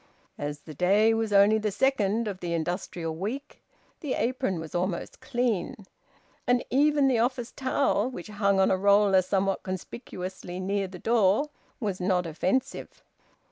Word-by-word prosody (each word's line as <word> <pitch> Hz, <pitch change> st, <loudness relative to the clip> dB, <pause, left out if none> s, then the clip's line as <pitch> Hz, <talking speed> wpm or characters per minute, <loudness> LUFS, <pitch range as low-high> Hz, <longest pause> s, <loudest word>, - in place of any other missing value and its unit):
As 145 Hz, 0 st, -4 dB
the 155 Hz, -, -10 dB
day 200 Hz, +8 st, +3 dB
was 225 Hz, -1 st, -1 dB
only 205 Hz, +2 st, +5 dB
the 215 Hz, 0 st, -1 dB
second 225 Hz, -1 st, +1 dB
of 195 Hz, -3 st, -4 dB
the 175 Hz, -2 st, -3 dB
industrial 165 Hz, -1 st, -3 dB
week, 235 Hz, -, -5 dB, 0.4 s
the 290 Hz, -6 st, -2 dB
apron 245 Hz, -, -1 dB
was 160 Hz, -1 st, -8 dB
almost 175 Hz, 0 st, -2 dB
clean; 245 Hz, -4 st, -1 dB, 0.7 s
and 245 Hz, 0 st, +2 dB
even 290 Hz, +1 st, +4 dB
the 250 Hz, -4 st, +2 dB
office 245 Hz, 0 st, -1 dB
towel, 260 Hz, -1 st, +1 dB
which 180 Hz, -9 st, -8 dB
hung 200 Hz, -2 st, +1 dB
on 190 Hz, -, +4 dB
a 190 Hz, -, +3 dB
roller 200 Hz, 0 st, +5 dB
somewhat 195 Hz, +1 st, 0 dB
conspicuously 185 Hz, -1 st, -6 dB
near 195 Hz, +1 st, -1 dB
the 185 Hz, 0 st, -10 dB
door, 225 Hz, -, +2 dB, 0.3 s
was 200 Hz, -6 st, -3 dB
not 180 Hz, -1 st, +1 dB
offensive. 185 Hz, +10 st, -2 dB
200 Hz, 150 wpm, -27 LUFS, 185-240 Hz, 0.7 s, only